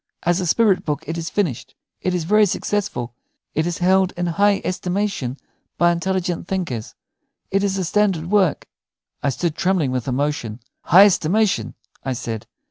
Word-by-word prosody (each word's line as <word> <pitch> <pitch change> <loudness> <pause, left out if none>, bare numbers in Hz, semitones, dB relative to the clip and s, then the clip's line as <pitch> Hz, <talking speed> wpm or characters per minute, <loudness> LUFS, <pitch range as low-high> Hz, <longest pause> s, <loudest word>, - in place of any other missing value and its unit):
"As 175 +2 +2
a 180 - -2
spirit 205 0 +3
book 150 0 -2
it 165 - -3
is 165 0 -4
finished. 175 - -2 0.3
It 185 -1 0
is 175 - -1
very 210 +5 +4
successful; 180 - -2 0.4
it 155 +2 0
is 175 - -2
held 190 +1 +3
in 175 - -1
high 200 +4 +2
estimation 180 -8 -2 0.4
by 175 0 +4
intelligent 175 0 -2
thinkers; 165 - -3 0.6
it 195 +1 +2
is 195 -1 0
a 190 - -1
standard 190 -3 +1
work." 195 -7 +2 0.5
I 140 - +1
stood 160 +5 -1
trembling 180 -7 +1
with 130 -1 -2
emotion. 130 -4 -2 0.3
"High 190 +5 +8
estimation!" 180 - +1 0.3
I 130 - -1
said. 115 -2 -5
175 Hz, 160 wpm, -21 LUFS, 145-195 Hz, 0.6 s, High